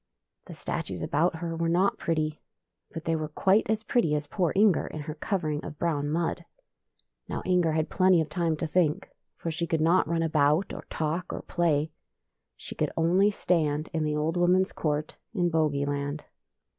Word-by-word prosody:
The - - -9
statues 90 -3 -4
about 165 +4 +1
her 165 0 -4
were 165 0 0
not 180 +4 +2
pretty, 155 -2 -1 0.5
but 165 - -7
they 165 - +1
were 155 -1 -2
quite 190 +8 +2
as 220 0 0
pretty 215 -9 +1
as 150 0 -2
poor 175 +1 0
Inger 200 -2 +4
in 155 - -6
her 150 +1 -5
covering 155 -3 -2
of 150 - -7
brown 145 -3 -1
mud. 165 +2 -1 0.8
Now - - -4
Inger 180 -3 +2
had 155 0 0
plenty 185 -2 +4
of 160 - 0
time 160 0 -1
to 165 - -2
think, 160 -1 0 0.3
for 165 - -3
she 170 +1 -2
could 160 - 0
not 170 +4 +3
run 165 0 0
about, 155 +2 +2
or - - -8
talk, 160 +3 -2
or - - -5
play. 160 -3 0 0.7
She - - -8
coidd - - -1
only 180 +5 +4
stand 155 -6 0
in 160 -1 0
the 150 0 0
old 155 +3 0
woman's 180 +2 +3
court 150 -1 -2 0.2
in 175 -3 +1
Bogey 150 -3 +1
land. 145 +1 -3
160 Hz, 185 wpm, -27 LUFS, 150-175 Hz, 0.8 s, Inger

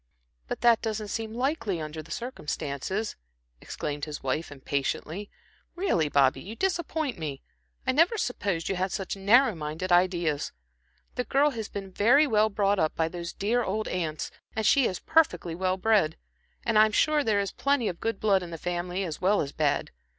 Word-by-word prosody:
"But - - -4
that 235 -2 +5
doesn't 215 -2 -3
seem 225 +1 -4
likely, 240 - -1
under 155 0 -5
the 160 - -16
circumstances," 180 - -3 0.5
exclaimed 145 -1 -4
his 150 -1 -7
wife, 135 +5 -2
impatiently. 145 +7 -3 0.5
"Really, 260 - +1
Bobby, 140 -1 +3
you 210 +5 -8
disappoint 320 - -1
me. 145 -4 -5 0.4
I 260 - +3
never 330 - +3
supposed 200 - -1
you 195 - -1
had 185 +1 -1
such 195 +1 -3
narrow 220 +6 +5
minded 160 +3 -4
ideas. 175 -4 +2 0.6
The 250 - -1
girl 285 +3 +3
has 225 -5 -5
been 195 -2 -6
very 245 +11 +5
well 215 -5 +3
brought 200 -1 +1
up 155 -2 +1
by 160 0 +1
those 170 0 -5
dear 235 +5 0
old 215 +2 -2
aunts, 160 -4 -3 0.2
and 220 - -1
she 270 +3 +5
is 185 - -3
perfectly 180 - +2
well 185 +2 0
bred. 195 -6 +2 0.5
And 225 -2 +3
I'm 215 0 +5
sure 305 +3 +3
there 215 -4 +2
is 200 -1 -1
plenty 280 -5 +1
of 175 - -4
good 225 -3 -1
blood 200 -3 +3
in 175 - -7
the 165 - -6
family 175 +2 -2
as 160 -5 -5
well 200 +3 +3
as 140 - -2
bad. 145 -2 0
195 Hz, 180 wpm, -27 LUFS, 165-225 Hz, 0.6 s, that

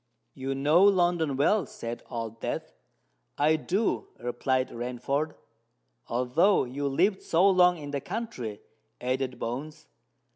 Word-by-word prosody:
"You 135 0 -3
know 150 +6 +4
London 175 -7 +3
well," 190 +8 +3
said 115 0 -6
Old 115 -2 -5
Death. - - -4 0.6
"I 155 +2 +4
do," 175 - -1
replied 130 +2 -1
Rainford. 125 +5 -2 0.7
"Although 125 - +3
you 135 +3 -3
lived 185 +8 +2
so 175 +4 +3
long 180 -2 +5
in 145 -2 -7
the 140 -1 -2
country," 130 - -5 0.4
added 130 0 -2
Bones. 145 +7 -5
140 Hz, 120 wpm, -28 LUFS, 125-175 Hz, 0.7 s, long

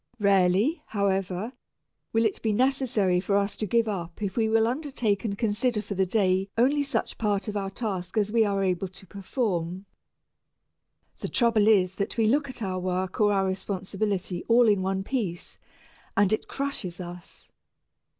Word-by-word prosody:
Rarely, 200 - +3
however, 195 +1 -1 0.6
will 225 0 +2
it 215 - -1
be 220 - +1
necessary 240 -6 +2
for 200 +2 +1
us 200 0 0
to 215 - -3
give 230 +3 +2
up 175 -5 -4
if 200 -3 -3
we 220 -2 +2
will 225 0 +4
undertake 245 -6 -1
and 200 -3 -2
consider 225 +2 +1
for 210 - -5
the 190 -1 +1
day 190 -1 +1
only 275 +5 +3
such 275 -5 -2
part 205 -2 0
of 210 - -4
our 195 -1 -2
task 195 -3 -4
as 210 -1 +1
we 225 0 +4
are 200 -2 0
able 185 0 0
to 190 +1 -14
perform. 190 -2 -3 1.3
The - - -4
trouble 230 -4 +3
is 190 -4 +4
that 200 - -3
we 225 - +3
look 280 +6 +2
at 245 -3 -6
our 185 -2 -2
work 185 +2 -2
or 205 -1 +5
our 195 -1 +2
responsibility 190 0 -2
all 235 0 +5
in 205 -3 +3
one 190 0 -1
piece, 200 -8 -4 0.6
and 200 +1 +4
it 215 - -1
crushes 255 -11 -4
us. 175 0 -9
200 Hz, 170 wpm, -27 LUFS, 190-225 Hz, 1.3 s, or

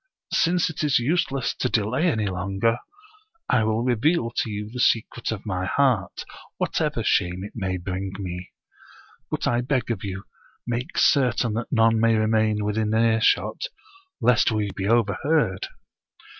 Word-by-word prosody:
Since 175 0 +2
it 155 - -5
is 145 -2 +3
useless 135 0 0
to 125 - +1
delay 120 - +1
any 110 -10 +1
longer, 95 +5 0 0.7
I 115 -3 +3
will 110 +1 0
reveal 125 +1 +1
to 115 - -2
you 105 0 -4
the 125 - -6
secret 115 0 +1
of 110 -2 -5
my 95 -3 -2
heart, 125 -9 +1 0.3
whatever - - -1
shame 90 +1 +1
it 105 - -7
may 95 -4 -2
bring 95 +2 -4
me. 90 -2 -6 0.8
But - - -2
I 120 0 +1
beg 125 -1 -1
of 105 -5 -3
you, 95 -1 -5 0.4
make 120 +6 -3
certain 125 -4 +3
that 115 +2 -4
none 115 -2 +4
may 115 0 +4
remain 110 -1 +1
within 105 0 0
earshot, 110 - +2 0.5
lest 125 -1 +3
we 105 -2 -1
be 95 - -2
overheard." 115 - +1
110 Hz, 150 wpm, -24 LUFS, 100-125 Hz, 0.8 s, none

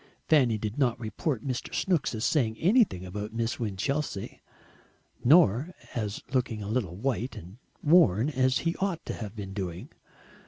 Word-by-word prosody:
Fanny 130 -8 +4
did 105 +5 -4
not 120 -4 +2
report 115 - -3
Mr. 130 -2 -3
Snooks 175 -10 0
as 110 - -2
saying 115 -8 +1
anything 185 - +3
about 105 +4 -6
Miss 115 +1 -1
Winchelsea, 115 +2 -3 0.8
nor 150 - +5 0.2
as 105 -3 -3
looking 115 -5 0
a - - -6
little 105 -6 -1
white 125 +3 -2
and 90 +8 -11 0.2
worn, 145 - +5
as 130 -1 +2
he 165 - +1
ought 190 -4 -2
to - - -3
have 105 -1 -7
been 100 -3 -6
doing. 90 -3 -5
120 Hz, 155 wpm, -28 LUFS, 105-145 Hz, 0.8 s, nor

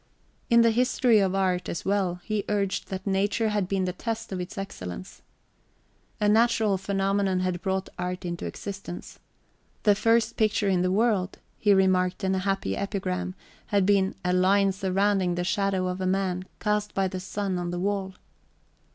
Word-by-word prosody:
In 235 -1 +6
the 230 - +5
history 245 -1 +3
of 195 -1 +1
art, 185 -2 0
as 170 - -4
well, 190 -3 0
he 215 -2 -1
urged 200 -2 -1
that 190 0 -5
nature 205 +3 +1
had 205 -3 0
been 190 -1 0
the 180 - -2
test 225 +3 -4
of 185 -1 -3
its 180 +4 -7
excellence. 90 - -7 1.0
A 210 - +1
{xvi} 205 - +5
natural 220 -3 +3
phenomenon 195 -1 0
had 180 -1 -1
brought 190 0 -1
art 180 +1 -3
into 170 0 -4
existence. 195 -3 -7 0.6
The 205 - +6
first 230 +2 +2
picture 215 -1 +2
in 185 -2 +2
the 185 - +1
world, 195 -2 +1 0.2
he 205 - +3
remarked 185 -1 +3
in 190 0 +1
a 190 - +1
happy 195 - -1
epigram, 185 -2 -3 0.3
had 200 -3 +2
been 195 -1 +2
"a 180 - +2
line 195 +2 +4
surrounding 190 -1 +1
the 175 - -1
shadow 190 0 0
of 180 +1 -3
a 185 - 0
man, 185 -1 0
cast 210 0 -1
by 195 -1 +2
the 185 0 -5
sun 185 0 -3
on 175 0 -3
the 175 - -3
wall." 190 0 -2
195 Hz, 175 wpm, -26 LUFS, 185-205 Hz, 1.0 s, In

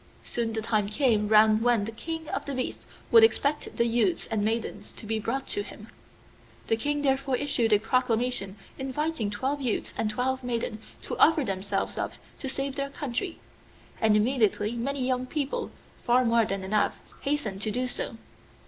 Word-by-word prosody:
Soon 235 -1 -1
the 220 0 -2
time 215 -3 +1
came 215 -3 +2
round 215 0 +6
when 235 -3 +3
the 225 - -4
king 320 +7 -5
of - - -2
the 280 - -3
beasts 255 - -3 0.2
would 455 -1 +8
expect 300 -9 +2
the 235 - +3
youths 240 +9 +2
and 220 -2 +1
maidens 225 +2 -2
to - - -9
be 220 +1 -1
brought 260 +5 -2
to 410 - -1
him. - - -10 0.8
The 225 - +4
King 290 +5 -1
therefore 270 -1 +1
issued 250 -4 +1
a 210 - +7
proclamation 230 -2 0 0.2
inviting 270 -3 -1
twelve 265 +8 -2
youths 245 -5 -1
and 215 - 0
twelve 260 +4 -1
maidens 235 -2 -2 0.2
to - - -3
offer 315 -2 +6
themselves 195 -2 -2
up - - -2 0.3
to 270 - -3
save 275 +1 -3
their 275 0 -1
country; 285 +6 -4 0.6
and 215 -1 +5
immediately 215 -2 +2
many 255 +3 -2
young 255 0 0
people, 285 0 -2 0.3
far 250 +1 +3
more 230 -1 +4
than 195 -1 -3
enough, 210 +2 +1 0.2
hastened 275 -9 -1
to 215 - 0
do 250 +4 -1
so. 230 - -3
240 Hz, 175 wpm, -27 LUFS, 215-275 Hz, 0.8 s, would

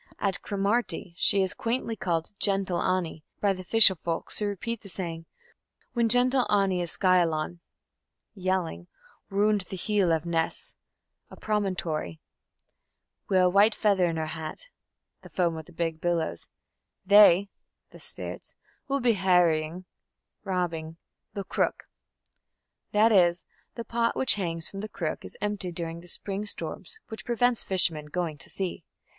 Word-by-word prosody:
At 195 -2 -2
Cromarty 200 -2 -1
she 195 +2 +3
is 190 - -2
quaintly 230 -1 -2
called 170 -4 -2
"Gentle 195 -3 +2
Annie" 175 -4 -1 0.2
by 200 -1 +2
the 185 -1 -8
fisher 215 +1 +7
folks, 165 -1 -3
who 210 - 0
repeat 205 +3 -4
the 200 - -12
saying: 165 -3 -5 0.7
"When 235 -2 +2
Gentle 250 +2 +4
Annie 195 -3 +2
is 175 - -2
skyawlan 175 -3 +2 0.7
(yelling) 185 - -2 0.4
roond 205 +1 +2
the 190 - -5
heel 200 -2 +1
of 160 0 0
Ness 165 -1 -2 0.6
(a - - -11
promontory) 180 - -2 1.1
wi' 190 - +3
a 185 0 +5
white 200 +4 +4
feather 195 -4 +2
on 165 - -2
her 160 -1 -2
hat 160 - -7 0.5
(the - - -13
foam 170 -3 0
of 160 -1 -8
big 165 -2 -2
billows) 165 - -1 0.6
they 200 -1 +7 0.4
(the - - -14
spirits) - - -8 0.3
will 275 0 0
be 240 -1 +4
harrying 180 -3 +2 0.6
(robbing) 170 -4 -3 0.4
the 200 - -3
crook" - - -1 1.0
that 215 +2 +4
is, 175 -4 +4 0.3
the 235 - -6
pot 230 +1 0
which 265 - +4
hangs 165 -5 -2
from 195 - -7
the 215 +2 -5
crook 165 -6 -4
is - - -10
empty 205 -3 -2
during 165 -1 -4
the 175 - -15
spring 195 +3 -1
storms, 445 - -1
which 220 - -7
prevent 245 0 +1
fishermen 165 -5 +2
going 160 -1 -3
to - - -6
sea. 185 -3 -4
185 Hz, 145 wpm, -27 LUFS, 165-210 Hz, 1.1 s, fisher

